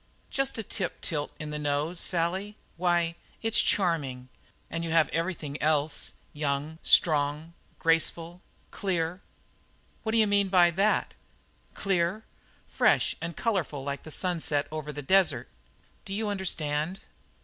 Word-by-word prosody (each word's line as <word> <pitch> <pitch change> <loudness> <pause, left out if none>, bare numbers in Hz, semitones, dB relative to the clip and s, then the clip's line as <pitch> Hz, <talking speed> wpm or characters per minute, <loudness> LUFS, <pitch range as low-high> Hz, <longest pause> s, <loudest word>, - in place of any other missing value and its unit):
"Just 270 -2 -1
a 225 - -2
tip 190 -3 -4
tilt 150 -2 -2
in 150 -1 -5
the 150 - -3
nose, 150 +4 -1
Sally. 190 +5 0 0.2
Why, 175 -1 +1 0.3
it's 225 0 +5
charming. 140 -9 +1 0.4
And 165 0 -4
you 165 - -3
have 160 -3 +4
everything 165 -4 -3
else 150 -1 +1 0.2
young, 145 +2 -2
strong, 150 +1 +3 0.2
graceful, 165 +1 +1 0.3
clear." 180 -2 -2 0.8
"What 220 -1 -2
d'you 225 -1 +5
mean 200 -1 +3
by 175 -2 +5
that?" 195 +5 +1 0.6
"Clear? 195 +2 0 0.4
Fresh - - +3
and 165 +1 -5
colourful 175 - -1
like 140 0 -3
the - - -10
sunset 160 -4 0
over 155 -1 -4
the 145 -1 -6
desert. 170 -6 +3 0.6
Do 195 - -5
you 215 0 -1
understand?" 170 -3 -2
165 Hz, 130 wpm, -28 LUFS, 150-190 Hz, 0.8 s, it's